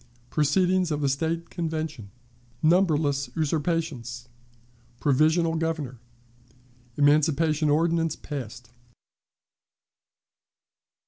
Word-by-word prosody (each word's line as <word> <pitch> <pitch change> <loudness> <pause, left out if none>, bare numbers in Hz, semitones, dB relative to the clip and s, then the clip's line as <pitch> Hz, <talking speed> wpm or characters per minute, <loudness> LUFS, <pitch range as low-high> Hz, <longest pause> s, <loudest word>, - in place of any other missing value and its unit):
Proceedings 180 +4 +2
of 150 -1 -2
the 140 - +1
State 165 +4 -2
Convention. 160 - -4 0.5
Numberless 155 -5 +2
Usurpations. 150 -7 -2 0.7
Provisional 155 +5 +2
Governor. 160 -6 -3 1.0
Emancipation 150 +1 +3
Ordinance 165 +1 +1
passed. 120 -4 -8
155 Hz, 65 wpm, -26 LUFS, 140-165 Hz, 1.0 s, Emancipation